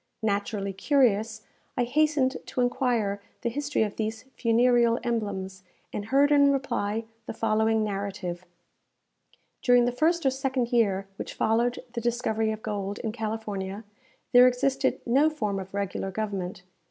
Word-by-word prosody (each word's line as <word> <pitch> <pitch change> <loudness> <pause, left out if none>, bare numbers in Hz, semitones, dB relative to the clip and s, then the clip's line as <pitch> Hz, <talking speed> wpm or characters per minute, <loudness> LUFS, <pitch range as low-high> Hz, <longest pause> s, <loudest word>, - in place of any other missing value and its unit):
Naturally 200 -1 -1
curious, 220 -1 +2 0.3
I 245 - +3
hastened 280 +1 +2
to 250 - -2
enquire 235 -5 0 0.2
the 235 - 0
history 290 -2 0
of 210 -2 -4
these 220 0 -3
funereal 235 0 +3
emblems, 200 -5 -3 0.3
and 205 - -3
heard 275 +5 +3
in 285 -1 +6
reply 235 -5 -1 0.2
the - - -5
following 220 0 +2
narrative: 195 -3 -4 1.2
During 245 -1 +5
the 245 - +1
first 320 +6 +1
or 265 - +4
second 265 -2 -1
year 200 -5 +2
which - - -6
followed 235 +2 +1
the 235 - -3
discovery 225 -2 0
of 215 0 -6
gold 205 -1 -3
in 220 - -3
California, 215 -3 -4 0.5
there 250 0 +8
existed 265 +2 +1
no 275 +6 +4
form 210 -10 -2
of 190 0 -8
regular 200 -1 -3
government. 190 -3 -4
225 Hz, 140 wpm, -27 LUFS, 205-250 Hz, 1.2 s, there